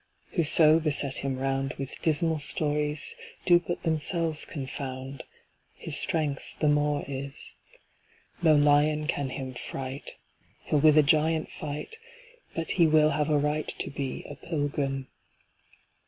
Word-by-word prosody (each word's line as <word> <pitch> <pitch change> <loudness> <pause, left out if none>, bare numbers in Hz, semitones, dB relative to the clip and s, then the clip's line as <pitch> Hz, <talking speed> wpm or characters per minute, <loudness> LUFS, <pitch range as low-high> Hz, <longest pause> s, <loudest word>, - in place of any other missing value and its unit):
"Whoso 160 -2 +4
beset 145 -3 -1
him 135 -1 -2
round 135 +1 -1
With 135 -1 -6
dismal 160 0 +1
stories, 150 0 0 0.3
Do 175 -1 +6
but 175 0 -5
themselves 160 0 0
confound 130 -1 -6 0.5
His - - -5
strength 150 -4 0
the 150 - +2
more 145 0 +2
is. 140 0 -5 0.9
No 160 -3 +6
lion 150 +1 +4
can 140 -3 -1
him 130 0 -5
fright; 130 +2 -6 0.5
He'll 150 - +1
with 155 +1 +6
a 155 - +8
giant 155 +1 +2
fight, 150 - -6 0.6
But 165 -1 -2
he 170 -3 +4
will 155 0 +5
have 150 +1 0
a 150 - +3
right 150 +1 0
To - - -2
be 140 -2 -4
a - - -7
pilgrim. 145 -3 -2
150 Hz, 135 wpm, -28 LUFS, 140-155 Hz, 0.9 s, a